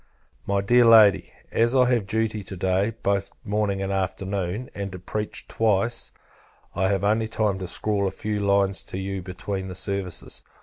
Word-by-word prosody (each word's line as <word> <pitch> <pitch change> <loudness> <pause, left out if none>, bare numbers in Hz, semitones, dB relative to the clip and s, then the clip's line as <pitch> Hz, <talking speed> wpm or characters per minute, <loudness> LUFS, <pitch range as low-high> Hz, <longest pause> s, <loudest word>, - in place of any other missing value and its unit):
My 100 0 +1
Dear 120 +4 +5
Lady, 110 -3 +6 0.2
As 115 +3 +2
I 130 -1 +6
have 110 -5 0
duty 110 0 -1
to 95 - -7
day, 95 +4 +1
both 100 -1 0 0.2
morning 100 -2 0
and 95 0 -2
afternoon, 95 +3 -2
and 100 -1 -5
to - - -5
preach 105 +4 -4
twice, 115 +2 0 0.6
I 95 - +1
have 100 -1 0
only 110 +2 +2
time 105 -3 0
to 95 - -4
scrawl 100 +2 0
a - - +1
few 105 +2 -3
lines 100 -1 +2
to - - -8
you 95 0 -3
between 95 +1 -5
the 90 - -7
services. 95 -1 -2
100 Hz, 175 wpm, -24 LUFS, 95-110 Hz, 0.6 s, Lady